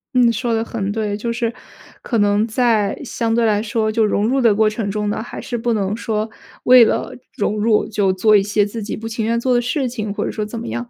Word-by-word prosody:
嗯， 240 -2 +4
说 235 +1 -1
得 225 0 -1
很 205 -4 -3
对。 210 -1 -2
就 230 +3 -3
是 235 0 -2 0.5
可 235 - -2
能 205 +1 +2
在 220 -3 +1
相 230 -3 -2
对 235 0 +2
来 210 -2 +2
说， 220 0 -1
就 225 +1 +1
融 210 0 +1
入 265 +3 +1
的 230 -4 +4
过 220 +1 +3
程 215 -1 -3
中 210 +1 -2
呢， 205 - -2
还 235 - -8
是 245 - -5
不 235 +1 0
能 200 -1 -1
说 220 -1 -2 0.3
为 250 -1 +8
了 - - 0 0.2
融 210 +1 -1
入 215 -1 +2
就 205 -3 +1
做 210 +3 +3
一 205 - +5
些 205 +1 +1
自 220 +2 -6
己 210 - -4
不 225 - -6
情 225 -1 -3
愿 230 +1 0
做 255 +1 +1
的 240 - +3
事 255 +2 -1
情， 215 -4 -4
或 - - -3
者 - - -2
说 215 - -3
怎 215 +2 -6
么 - - -6
样。 120 +1 -5
220 Hz, 275 characters per minute, -19 LUFS, 210-235 Hz, 0.5 s, 为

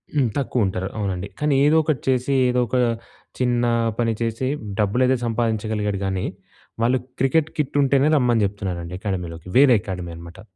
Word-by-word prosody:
హ్మ్. 135 -5 +2
తక్కువ 125 -5 0
ఉంటారు. 95 0 -2
అవునండి. 100 -2 -2
కానీ 150 -1 +2
ఏదో 155 +2 +5
ఒకటి 150 -5 -1
చేసి, 130 +2 +1 0.2
ఏదో 125 0 +2
ఒక 120 - -3 0.6
చిన్న 120 -1 +1 0.4
పని 115 -1 +2
చేసి, 115 +3 -1 0.3
డబ్బులైతే 125 +6 +2
సంపాదించగలిగాడు 110 -3 -1
గానీ, 95 -1 -1 0.6
వాళ్ళు 125 +2 +3 0.2
క్రికెట్ 145 +4 +2
కిట్ 145 -2 -2
ఉంటేనే 140 +2 +3
రమ్మని 120 -5 +3
జెప్తున్నారండి 90 -3 -4
అకాడమీలోకి 90 -5 -4
వేరే 135 -2 +7
అకాడమీ 90 -3 -5
అనమాట. 85 +3 -11
115 Hz, 150 wpm, -22 LUFS, 95-130 Hz, 0.6 s, వేరే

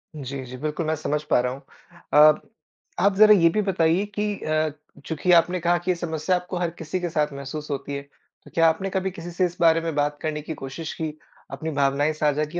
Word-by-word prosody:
जी, 135 -2 -6
जी, 125 +1 -9
बिल्कुल 155 +4 -3
मैं 160 +1 0
समझ 150 -1 -2
पा - - +4
रहा 125 0 -1
हूँ। 135 - -10 0.6
अब 155 0 +5 0.6
आप 200 0 +3
ज़रा 215 +1 +8
ये 170 -3 +5
भी 210 - 0
बताइए 170 +1 +2
कि 210 - +1
अ, 155 0 0 0.4
चूंकि 165 +3 0
आपने 175 +2 +4
कहा 175 +1 +2
कि 175 +2 -1
ये - - 0
समस्या 170 +1 -1
आपको 180 0 -4
हर 175 -1 0
किसी 165 +3 -3
के 175 - -2
साथ 150 -2 0
महसूस 140 +2 -6
होती 140 0 -4
है, 140 - -4
तो 140 - -23
क्या 165 -1 +5
आपने 175 +5 -2
कभी 190 0 -1
किसी 175 0 -8
से 180 +2 +1
इस 175 0 -5
बारे 165 -1 +5
में 165 -1 -3
बात 145 0 0
करने 155 -1 -2
की 155 +2 -6
कोशिश 155 +4 -5
की? 155 -1 -3 0.3
अपनी 155 +4 -4
भावनाएँ 140 +1 +1
साझा 150 0 +1
की 175 - -3
160 Hz, 230 wpm, -24 LUFS, 150-175 Hz, 0.6 s, ज़रा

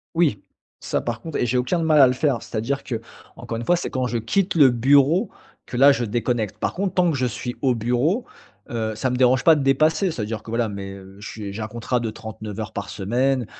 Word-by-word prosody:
Oui, 150 - +2 0.4
ça, - - -2
par 115 -1 -3
contre 160 - -5
et - - +1
j'ai 125 +2 0
aucun 125 +8 0
de 165 - -1
mal 155 -2 +4
à 135 - +9
le 125 - +1
faire. 130 -2 0
C'est-à-dire 120 +5 -3
qu'encore 115 -1 -7
une 115 - -5
fois, 175 - +4
c'est 175 - -3
quand 130 -1 -1
je 120 - -2
quitte 175 - 0
le 145 -5 +7
bureau 140 - +3 0.4
que - - -8
là, 140 +2 +7
je 125 -3 0
déconnecte. 115 -1 -2
Par - - -2
contre, 185 0 -2
tant 180 -2 +3
que 140 - -2
je 125 - 0
suis 125 +1 -4
au 130 -3 +2
bureau, 125 - 0 0.4
heu, 110 -2 -2
ça 130 +4 -1
me 125 - -1
dérange 125 0 +3
pas 165 -2 +7
de 145 - -1
dépasser. 155 +6 +2
C'est-à-dire 110 -4 -4
que, 110 - -10
voilà, 115 -1 0
mes 95 -1 -6
heu, 95 0 -13
je 105 - -8
suis 100 -2 -7
j'ai 110 - -5
un 110 - -3
contrat 120 +2 -2
de 115 -1 -2
39 110 -1 -8
heures 110 - -4
par 100 0 -4
semaine. 125 +5 0
125 Hz, 245 wpm, -22 LUFS, 110-140 Hz, 0.4 s, à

